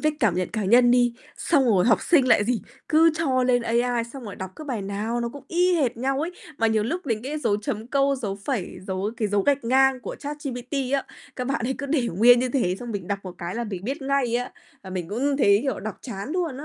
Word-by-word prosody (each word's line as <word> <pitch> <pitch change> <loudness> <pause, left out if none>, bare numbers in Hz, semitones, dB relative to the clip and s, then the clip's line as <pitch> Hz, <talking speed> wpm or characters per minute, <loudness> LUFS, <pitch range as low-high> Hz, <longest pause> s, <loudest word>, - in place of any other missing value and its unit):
viết 310 - +2
cảm 210 -7 +3
nhận 180 0 -1
cá 215 -2 -2
nhân 240 +4 +5
đi, 245 -1 +3 0.2
xong 285 -5 +2
rồi 200 -7 +3
học 225 - +4
sinh 275 -7 +3
lại 205 - +5
gì? 235 -2 -1 0.3
Cứ 325 +1 +5
cho 265 -6 +1
lên 245 -1 +3
AI, 235 0 +1
xong 270 - -8
rồi 205 -3 -7
đọc 190 -1 -6
cứ 310 - -8
bài 240 -8 -3
nào 210 +4 -2
nó 235 - -1
cũng 280 +2 -11
y 360 +1 +2
hệt 255 -7 0
nhau 270 +3 -1
ấy. 330 - -2 0.3
Mà 225 - +3
nhiều 220 -1 +2
lúc 340 +6 -3
đến 225 -3 -1
cái 290 +4 -3
dấu 225 -8 +1
chấm 215 +1 -4
câu, 275 +1 +2
dấu 205 -6 -4
phẩy, 220 -10 -3
dấu 190 +2 -2
cái 215 -3 -1
dấu 200 -1 +1
gạch 280 -2 +1
ngang 265 +2 +3
của - - -6
ChatGPT 280 -4 -6 0.2
á, 275 - +1 0.3
các 250 -1 -3
bạn 270 -3 -1
ấy 265 - -1
cứ 285 - -4
để 270 -4 +1
nguyên 235 +8 +6
như 255 +1 0
thế, 195 -9 0
xong 240 -1 -6
mình 200 -4 -5
đọc 200 -1 -1
một 185 -2 -8
cái 175 +3 -5
là 235 - -2
mình 195 -3 -6
biết 275 +5 -3
ngay 270 -3 0
á, 245 +1 -4 0.3
và 190 - -9
mình 180 -3 -4
cũng 270 +7 0
thấy, 200 -6 +5
kiểu, 270 -7 -2
đọc 215 0 -6
chán 210 -1 -6
luôn 335 -7 -2
á. 290 - -7
245 Hz, 265 wpm, -24 LUFS, 210-275 Hz, 0.3 s, nguyên